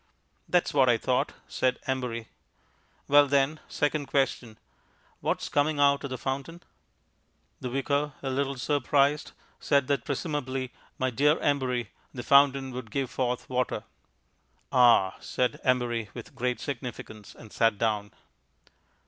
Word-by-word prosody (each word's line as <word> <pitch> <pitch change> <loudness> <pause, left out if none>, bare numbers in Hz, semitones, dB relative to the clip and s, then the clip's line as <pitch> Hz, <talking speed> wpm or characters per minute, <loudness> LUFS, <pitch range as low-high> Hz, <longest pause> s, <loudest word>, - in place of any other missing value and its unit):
"That's 180 -1 +2
what 135 -3 +4
I 120 - +4
thought," 125 +2 0
said 130 -1 0
Embury. 125 -4 -2 0.8
"Well, 145 0 +6
then, 140 +2 +2
second 145 -1 -1
question 125 -5 -1 0.6
What's - - -1
coming 145 +1 +1
out 140 0 +4
of 140 - -4
the 130 - -4
fountain?" 140 +7 -4 1.0
The 125 - -4
Vicar, 140 +3 -1
a 135 - -2
little 140 0 -1
surprised, 145 +2 +1 0.3
said 140 -2 +2
that 140 -4 +1
presumably, 135 -4 -3 0.3
my 130 0 0
dear 145 +5 +3
Embury, 130 -4 0 0.2
the 120 - -5
fountain 140 0 +4
would 125 -3 -7
give 135 +2 -2
forth 125 -1 -2
water. 125 -1 -1 0.9
"Ah!" 120 -7 +5
said 125 -2 -1
Embury 120 -4 0
with 120 - -9
great 125 0 -2
significance, 120 -5 -7
and 110 - -14
sat 115 -2 +2
down. 105 -2 -1
130 Hz, 130 wpm, -28 LUFS, 120-140 Hz, 1.0 s, Well